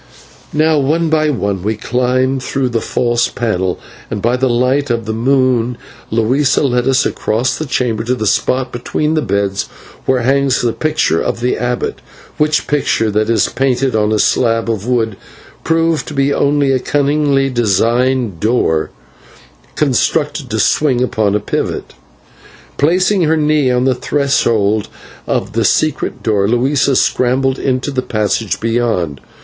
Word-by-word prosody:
Now 155 0 +2
one 160 +4 +1
by 155 -1 +2
one 100 -8 -2
we 110 +4 -1
climbed 130 +3 0
through 130 0 -1
the 115 -2 -1
false 120 -1 0
panel, 95 -6 -2 0.3
and - - -3
by 120 +4 +1
the 130 +1 0
light 125 +4 +1
of 115 -2 -1
the 110 - -3
moon 125 0 +1 0.3
Luisa 130 +6 +1
led 125 -2 +1
us 135 -1 +3
across 120 +4 -1
the 155 - -5
chamber 120 -4 -1
to 125 +2 0
the 110 - -3
spot 125 +5 0
between 150 +5 -2
the 155 - +1
beds, 100 -3 -1 0.4
where 130 -1 +2
hangs 135 +1 +2
the 120 -2 +1
picture 155 - 0
of - - -2
the 125 +1 0
abbot, 125 0 -3 0.4
which 150 0 +1
picture, 125 -6 0
that 105 +1 0
is 115 - +2
painted 130 -1 0
on 105 0 +1
a 110 - +2
slab 115 +1 +1
of 110 0 -4
wood, 115 -5 0 0.5
proved 165 -1 +1
to 150 - -7
be 140 +1 +2
only 140 -1 +2
a 130 - +2
cunningly 140 0 +1
devised 120 -1 +1
door 105 -8 +1 0.9
constructed 145 0 0
to 110 - -2
swing 130 +2 +2
upon 105 -5 0
a - - +2
pivot. 105 - -3 0.9
Placing 185 +6 +2
her 160 +1 +2
knee 150 -3 +2
on 125 0 +1
the 130 0 +2
threshold 115 -7 0 0.4
of - - -2
the - - +1
secret 155 -2 0
door, 100 -3 +1
Luisa 135 +4 +1
scrambled 130 +2 +1
into 130 +1 -1
the 130 -2 -1
passage 110 -2 -1
beyond. 110 - -1
125 Hz, 155 wpm, -15 LUFS, 115-140 Hz, 0.9 s, us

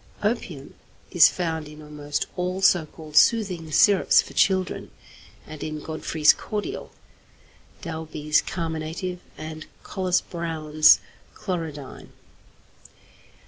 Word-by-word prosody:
Opium 180 - -3 0.4
is 175 - +7
found 160 -4 -3
in 150 0 -12
almost 150 -1 -4
all 180 +1 -2
so 175 -4 +4
called 155 -1 -12
'soothing 180 -5 +3
syrups' 200 +5 +5
for - - -2
children, 185 -2 +1 0.6
and 155 -1 -9
in 155 -1 -4
Godfrey's 155 0 +2
cordial, 215 - -5 0.9
Dalby's 155 -3 -1
carminative, 165 +2 -4 0.2
and 155 0 -8 0.2
Collis 185 -1 0
Browne's 155 -3 +3 0.3
chlorodyne. 160 -7 -6
160 Hz, 100 wpm, -24 LUFS, 155-180 Hz, 0.9 s, is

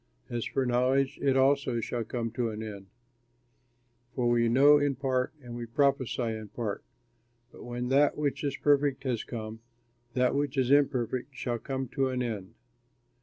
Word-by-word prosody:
As 120 -1 -2
for 135 - -1
knowledge 130 +3 +1
it 135 -1 +3
also 135 -2 +2
shall 115 +1 -3
come 115 0 -3
to 115 0 -1
an 110 0 -5
end; 100 -3 -8 1.3
for 125 -1 +1
we 120 -1 +3
know 145 +5 +6
in 145 -1 +1
part, 130 -1 0
and 120 -1 -8
we 120 -1 -5
prophesy 135 0 +1
in 110 -2 -3
part. 105 -1 -4 0.7
But - - -12
when 120 0 -4
that 140 +2 +3
which 150 -1 -1
is 140 -2 -1
perfect 140 -2 +2
has 125 -5 -1
come, 110 -1 -6 0.6
that 125 -1 +2
which 140 0 -1
is 130 0 +2
imperfect 130 -2 +1
shall 120 -2 -2
come 135 +1 -4
to 135 -1 0
an 125 -1 -1
end. 105 -6 -5
125 Hz, 170 wpm, -29 LUFS, 120-135 Hz, 1.3 s, know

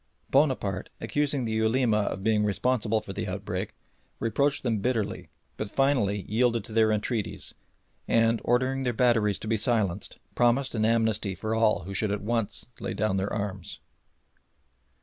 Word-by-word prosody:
Bonaparte, 130 -10 +1
accusing 145 -3 0
the 110 - -2
Ulema 110 0 +2
of 95 -2 -2
being 110 -1 +2
responsible 110 +1 +1
for 100 -2 -7
the 105 +2 -4
outbreak, 95 +1 -4 0.4
reproached 140 +6 +1
them 115 -4 0
bitterly, 115 -1 -2 0.3
but 105 - -3
finally 115 -8 +1
yielded 115 0 +2
to 110 - -7
their 110 -1 +4
entreaties, 105 -1 -2 0.5
and, 115 0 +3
ordering 130 +2 +1
the 125 -2 0
batteries 115 -4 +3
to - - -8
be 115 0 +1
silenced, 105 -5 0 0.2
promised 120 +3 +2
an 110 -2 +1
amnesty 110 -3 +1
for 110 +4 -3
all 110 -4 +2
who 100 +2 -6
should 105 +2 +1
at 100 0 -2
once 110 -2 -2
lay - - -4
down 100 -2 0
their 95 +1 -1
arms. 100 -2 -4
110 Hz, 155 wpm, -27 LUFS, 105-120 Hz, 0.5 s, their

